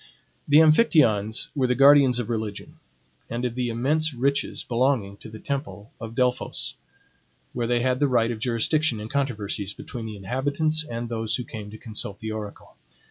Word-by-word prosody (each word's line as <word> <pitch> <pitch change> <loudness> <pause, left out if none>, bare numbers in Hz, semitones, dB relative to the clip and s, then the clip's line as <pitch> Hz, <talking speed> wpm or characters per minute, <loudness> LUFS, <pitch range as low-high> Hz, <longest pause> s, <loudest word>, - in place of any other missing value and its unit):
The 145 - +5
Amphictyons 155 - +4
were 130 -3 +2
the 125 - +1
guardians 140 -2 +6
of 120 -3 -2
religion, 110 -3 -5 0.5
and 120 +2 -3
of 120 - -2
the 125 0 -2
immense 145 +6 0
riches 140 +3 -1
belonging 120 -5 0
to 110 - -11
the 110 - -9
temple 135 -4 -5
of 115 0 -7
Delphos, 125 0 0 0.8
where 120 -1 -2
they 120 0 +1
had 130 0 +1
the 145 - +3
right 120 -3 +2
of 115 - -5
jurisdiction 120 +3 +1
in 105 +1 -7
controversies 105 -7 -2
between 115 -2 -7
the 105 -1 -7
inhabitants 145 +9 0
and 120 -4 -5
those 110 -2 -1
who 125 - -3
came 110 -3 -8
to 110 - -10
consult 105 -3 -6
the 110 +1 -5
oracle. 105 -2 -8
120 Hz, 175 wpm, -25 LUFS, 110-140 Hz, 0.8 s, guardians